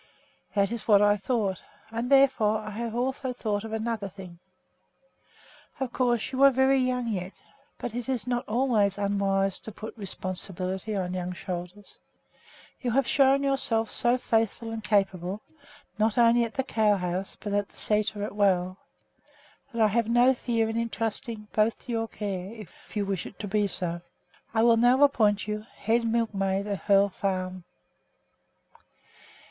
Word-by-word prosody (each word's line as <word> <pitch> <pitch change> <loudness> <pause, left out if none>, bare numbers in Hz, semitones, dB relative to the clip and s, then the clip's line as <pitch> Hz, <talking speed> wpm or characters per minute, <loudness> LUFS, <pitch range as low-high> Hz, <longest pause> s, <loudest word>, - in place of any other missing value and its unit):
"That 200 0 +2
is 235 -2 -5
what 205 -2 +6
I 205 0 +5
thought, 205 -3 -1 0.3
and 230 +2 -3
therefore 260 -6 +4
I 215 0 -7
have 230 +2 -4
also 260 +1 -1
thought 210 -4 -2
of 225 - -7
another 220 -2 -2
thing. 180 -3 -11 1.4
Of 265 -3 -3
course 240 -3 +1
you 260 0 -2
are 275 - +9
very 265 +1 +3
young 250 -1 0
yet, 190 -4 -4 0.4
but 235 - -5
it 245 +2 -4
is 255 -3 -1
not 245 0 -1
always 215 -4 +2
unwise 195 -1 0
to 220 - -8
put 215 +2 -8
responsibility 190 0 -4
on 180 -2 -2
young 180 0 -3
shoulders. 180 +3 -7 0.8
You 250 - -1
have 265 +3 +2
shown 275 +1 +4
yourself 240 -5 0
so 240 +1 +2
faithful 225 -1 0
and 225 -1 -5
capable, 195 -2 0 0.6
not 215 +1 +2
only 235 0 +5
at 225 - -8
the 265 - 0
cow 215 -5 +2
house 180 0 -3
but 205 -1 -4
at 205 -1 +1
the - - -20
sæter 210 -1 0
as - - -6
well, 185 -3 +1 0.9
that 230 - -5
I - - +6
have 230 +1 +1
no 245 +2 +5
fear 230 -3 0
in 225 +1 -3
intrusting 225 -1 -3
both 215 +1 +2
to - - -5
your 225 -1 -1
care. 195 -3 -5
If 210 -6 -11 0.2
you 205 - 0
wish 195 -3 -3
it - - -13
to 210 - -5
be 205 +1 +1
so, 175 -2 -2 0.5
I 225 -1 +2
will 230 -1 +5
now 245 +4 +5
appoint 215 -7 +3
you 210 0 -3
head 230 +2 +1
milkmaid 200 -4 0
at 200 -2 -3
Hoel 200 0 +5
Farm." 185 -2 -3
215 Hz, 165 wpm, -27 LUFS, 195-235 Hz, 1.4 s, are